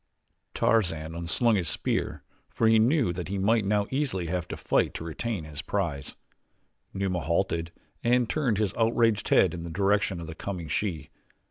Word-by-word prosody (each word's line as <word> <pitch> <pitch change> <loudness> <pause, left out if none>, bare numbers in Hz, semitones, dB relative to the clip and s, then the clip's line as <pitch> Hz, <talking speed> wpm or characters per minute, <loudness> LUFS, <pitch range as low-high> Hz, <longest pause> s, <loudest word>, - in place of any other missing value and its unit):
Tarzan 80 -8 +1
un 85 0 -5
slung 115 +5 +3
his 85 -5 -1
spear - - -2 0.3
for 115 - +1
he 110 0 +5
knew 120 - +3
that 90 0 -5
he 100 +1 -3
might 105 +2 +2
now 105 0 +2
easily 130 -10 -1
have 90 +1 -2
to - - -6
fight - - +1
to - - -5
retain 90 +3 -3
his 75 -2 -6
prize. 70 -1 -3 0.8
Numa 95 -2 -1
halted 85 +1 -1 0.3
and 125 0 +3
turned 125 -8 0
his 105 -2 0
outraged 115 -2 +2
head - - +4
in 85 - -5
the 85 - -6
direction 100 +1 +1
of 85 - -6
the 80 - -7
coming 90 -1 -5
she. 85 0 -2
95 Hz, 175 wpm, -27 LUFS, 85-110 Hz, 0.8 s, he